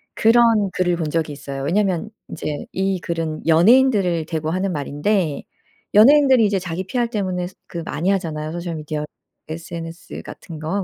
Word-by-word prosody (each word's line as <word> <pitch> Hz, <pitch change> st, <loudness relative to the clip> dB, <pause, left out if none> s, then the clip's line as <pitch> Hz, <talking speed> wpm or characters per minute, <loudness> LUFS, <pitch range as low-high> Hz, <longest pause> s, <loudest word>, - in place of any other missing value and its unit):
그런 225 Hz, -3 st, +4 dB
글을 180 Hz, -1 st, +1 dB
본 165 Hz, -3 st, -2 dB
적이 160 Hz, -1 st, -1 dB
있어요. 140 Hz, -1 st, -6 dB
왜냐면 190 Hz, +4 st, 0 dB, 0.2 s
인제 150 Hz, -1 st, -5 dB
이 190 Hz, -1 st, -1 dB
글은 165 Hz, -3 st, -4 dB
연예인들을 185 Hz, -1 st, +4 dB
대고 160 Hz, -1 st, -2 dB
하는 185 Hz, +2 st, -1 dB
말인데 150 Hz, +2 st, -1 dB, 0.5 s
연예인들이 260 Hz, +1 st, +7 dB
이제 200 Hz, -2 st, +1 dB
자기 180 Hz, +1 st, -4 dB
PR 240 Hz, +3 st, 0 dB
때문에 185 Hz, -5 st, -2 dB
스 185 Hz, -, -14 dB
그 170 Hz, -, -6 dB
많이 165 Hz, +6 st, -1 dB
하잖아요 155 Hz, -5 st, -2 dB
소셜 170 Hz, 0 st, -4 dB
미디어 150 Hz, -1 st, -4 dB, 0.4 s
SNS 165 Hz, +1 st, -7 dB
같은 160 Hz, -3 st, -10 dB
거. 175 Hz, +6 st, -2 dB
175 Hz, 350 characters per minute, -21 LUFS, 160-200 Hz, 0.5 s, 연예인들이